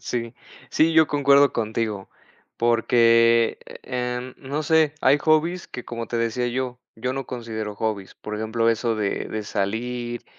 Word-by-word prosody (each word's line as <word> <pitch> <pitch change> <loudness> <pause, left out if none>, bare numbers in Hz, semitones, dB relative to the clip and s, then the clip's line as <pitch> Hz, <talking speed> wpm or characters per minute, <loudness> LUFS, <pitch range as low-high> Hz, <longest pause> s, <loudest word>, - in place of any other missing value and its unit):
Sí. 115 -1 -4 0.4
Sí, 160 +1 +3
yo 160 -1 +6
concuerdo 140 -1 +4
contigo, 110 -3 -2 0.5
porque, 115 0 +4 0.2
em, 125 0 -4
no 140 +3 -4
sé, 160 -1 +3
hay 140 +3 +4
hobbies 160 +4 +1
que, 125 - -8
como 115 -1 -5
te 120 - -3
decía 115 +1 0
yo, 125 0 -3 0.2
yo 125 +3 -3
no 135 -1 -4
considero 110 -4 -5
hobbies, 105 -3 -3
por 105 - -7
ejemplo, 115 +1 0
eso 115 0 0
de 105 -2 -2
de 110 0 -4
salir, 120 +4 -3
120 Hz, 150 wpm, -23 LUFS, 115-130 Hz, 0.5 s, yo